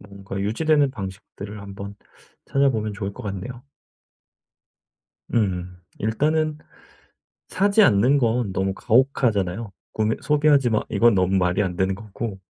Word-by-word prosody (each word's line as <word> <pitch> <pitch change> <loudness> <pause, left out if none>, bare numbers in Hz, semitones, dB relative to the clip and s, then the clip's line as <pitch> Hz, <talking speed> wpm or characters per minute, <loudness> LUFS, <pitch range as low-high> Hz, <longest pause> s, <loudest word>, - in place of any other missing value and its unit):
뭔가 100 -1 -8
유지되는 145 +7 +2
방식들을 100 0 -8
한번 100 0 -8 0.5
찾아보면 115 -7 +1
좋을 100 -1 -4
것 - - -10
같네요. 110 +5 -6 1.7
음. 90 -5 -1 0.2
일단은 150 +8 0 0.9
사지 200 +3 +3
않는 125 - +4
건 115 -4 0
너무 95 +1 0
가혹하잖아요. 115 -5 +1 0.2
구매 110 0 0
"소비하지 145 -3 +3
마." 110 - +2
이건 120 -1 +4
너무 95 0 +2
말이 90 +2 +2
안 90 -2 -3
되는 95 +1 +1
거고. 105 0 -6
105 Hz, 275 characters per minute, -23 LUFS, 95-130 Hz, 1.7 s, 않는